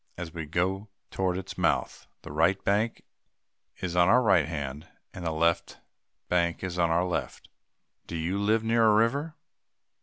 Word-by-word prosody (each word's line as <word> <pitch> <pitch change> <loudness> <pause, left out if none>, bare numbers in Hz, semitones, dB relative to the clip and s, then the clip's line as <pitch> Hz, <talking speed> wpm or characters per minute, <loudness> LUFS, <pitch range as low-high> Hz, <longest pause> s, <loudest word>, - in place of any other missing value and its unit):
As 85 -2 -6
we 80 -3 -5
go 95 +6 -1 0.2
toward 95 -1 -1
its 95 - -7
mouth, - - 0 0.2
the - - -9
right 85 +6 +2
bank 105 +3 0 0.8
is 90 -1 -2
on 90 +1 +4
our 125 +2 +5
right 95 -8 +4
hand, 75 -2 -5 0.3
and 90 - -8
the 80 - -1
left 85 +1 0 0.5
bank 85 -1 0
is 90 -1 -3
on 85 -1 +3
our 85 +2 +2
left. 90 - -4 0.6
Do - - -6
you 85 +5 -2
live 110 +2 +2
near 115 +1 +2
a 105 - +5
river? 140 +9 +1
90 Hz, 170 wpm, -28 LUFS, 85-105 Hz, 0.8 s, our